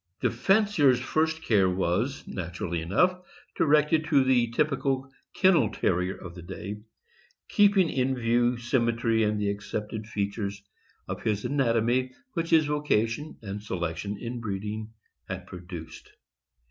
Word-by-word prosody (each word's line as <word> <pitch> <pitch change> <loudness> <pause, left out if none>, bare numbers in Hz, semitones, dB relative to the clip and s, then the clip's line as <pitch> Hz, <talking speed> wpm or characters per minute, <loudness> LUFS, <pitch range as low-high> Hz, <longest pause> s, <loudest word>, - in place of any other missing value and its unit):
The - - +2
fancier's 165 - +3
first 160 +4 0
care 100 -4 +3
was, 95 +9 -1
naturally 85 -2 -4
enough, 180 - +2 0.4
directed 155 +1 +3
to 145 -4 +4
the 125 -2 +3
typical 135 +1 0 0.3
kennel 170 - +4
Terrier 90 +1 0
of 90 -2 -9
the 90 - -10
day, 95 +4 -6 0.7
keeping 200 -3 +4
in 130 -2 0
view 120 0 +2
symmetry 115 -2 +1
and 105 0 +1
the 100 -1 +1
accepted 105 +1 -5
features 100 -1 -3 0.4
of - - -5
his 105 -2 -1
anatomy 125 -1 +1 0.2
which 165 -3 -2
his 160 -2 +5
vocation 150 -2 0
and 100 0 -5
selection 95 0 -3
in 120 +3 -5
breeding 105 +1 -4 0.4
had 95 -1 -5
produced. 85 -3 -9
115 Hz, 130 wpm, -27 LUFS, 100-140 Hz, 0.7 s, his